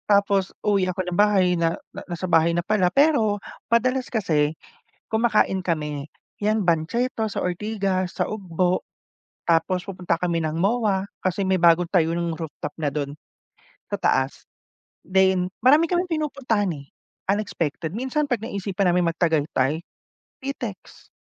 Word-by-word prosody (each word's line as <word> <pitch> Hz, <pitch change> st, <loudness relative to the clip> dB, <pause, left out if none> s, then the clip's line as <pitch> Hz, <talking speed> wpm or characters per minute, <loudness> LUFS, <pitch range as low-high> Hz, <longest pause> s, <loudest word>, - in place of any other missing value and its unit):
Tapos, 200 Hz, -1 st, +3 dB, 0.2 s
uwi 195 Hz, -3 st, +2 dB
ako 185 Hz, 0 st, -2 dB
ng 175 Hz, -, -3 dB
bahay 200 Hz, -3 st, +4 dB
na 165 Hz, 0 st, +1 dB, 0.3 s
nasa 175 Hz, +1 st, -3 dB
bahay 165 Hz, 0 st, +4 dB
na 175 Hz, 0 st, -1 dB
pala. 195 Hz, -4 st, +2 dB
Pero, 255 Hz, -8 st, +3 dB, 0.3 s
madalas 255 Hz, +2 st, +2 dB
kasi 155 Hz, -8 st, +1 dB, 0.5 s
kumakain 220 Hz, -4 st, +2 dB
kami. 150 Hz, -5 st, -2 dB, 0.4 s
Yan, 215 Hz, +1 st, +2 dB
banchetto 220 Hz, +9 st, 0 dB
sa -, -, -3 dB
Ortigas, 190 Hz, 0 st, -1 dB
sa -, -, +2 dB
Ugbo, 185 Hz, -3 st, -1 dB, 0.7 s
tapos 170 Hz, +2 st, +2 dB
pupunta 180 Hz, -3 st, -1 dB
kami 170 Hz, -1 st, 0 dB
ng 155 Hz, 0 st, -2 dB
MOA. 200 Hz, -1 st, +1 dB, 0.2 s
Kasi 185 Hz, +1 st, 0 dB
may 190 Hz, 0 st, +3 dB
bagong 170 Hz, 0 st, +4 dB
tayo 165 Hz, -3 st, +2 dB
nang 170 Hz, -1 st, -1 dB
rooftop 150 Hz, -2 st, -6 dB
na 150 Hz, -2 st, +1 dB
dun, 145 Hz, -1 st, -3 dB, 0.8 s
sa -, -, 0 dB
taas. 130 Hz, +1 st, 0 dB, 0.6 s
Then, 190 Hz, -1 st, +3 dB, 0.2 s
marami 295 Hz, +6 st, +6 dB
kaming 355 Hz, +1 st, 0 dB
pinupuntahan, 275 Hz, -, 0 dB
eh, 140 Hz, -1 st, -11 dB, 0.4 s
unexpected. 170 Hz, -6 st, -2 dB
Minsan, 265 Hz, +5 st, -1 dB
'pag 245 Hz, -5 st, 0 dB
naisipan 200 Hz, -4 st, -1 dB
naming 175 Hz, -1 st, +2 dB
mag-Tagaytay, 155 Hz, -3 st, +1 dB, 0.6 s
Pitex. 255 Hz, -7 st, -7 dB
185 Hz, 135 wpm, -24 LUFS, 165-215 Hz, 0.8 s, marami